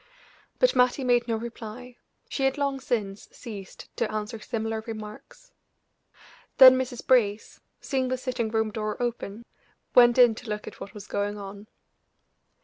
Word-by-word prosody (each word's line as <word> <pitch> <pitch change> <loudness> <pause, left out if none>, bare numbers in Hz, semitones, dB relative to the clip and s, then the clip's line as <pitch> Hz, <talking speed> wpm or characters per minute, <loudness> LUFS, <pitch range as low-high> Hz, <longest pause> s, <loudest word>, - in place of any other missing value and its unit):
But - - +3
Mattie 250 +2 +3
made 245 -1 +2
no 230 - 0
reply; 235 +2 -8 0.3
she 270 - -1
had 270 +2 +1
long 280 -1 -1
since 210 -6 -3
ceased 205 -6 -10
to 235 - -1
answer 215 +1 -4
similar 225 -1 -3
remarks. 215 - -9 1.1
Then 260 -2 +11
Mrs. 255 -2 -4
Brace, 220 -5 +1 0.2
seeing 265 -2 -1
the 255 0 -1
sitting 250 -3 -2
room 220 -1 0
door 215 0 -4
open, 235 -2 -4 0.5
went 240 -1 +6
in 245 -2 +7
to 230 +1 -10
look 210 0 -4
at - - -10
what 200 - -9
was 205 -1 -9
going 205 0 -2
on. 200 +1 -9
230 Hz, 150 wpm, -26 LUFS, 215-250 Hz, 1.1 s, Then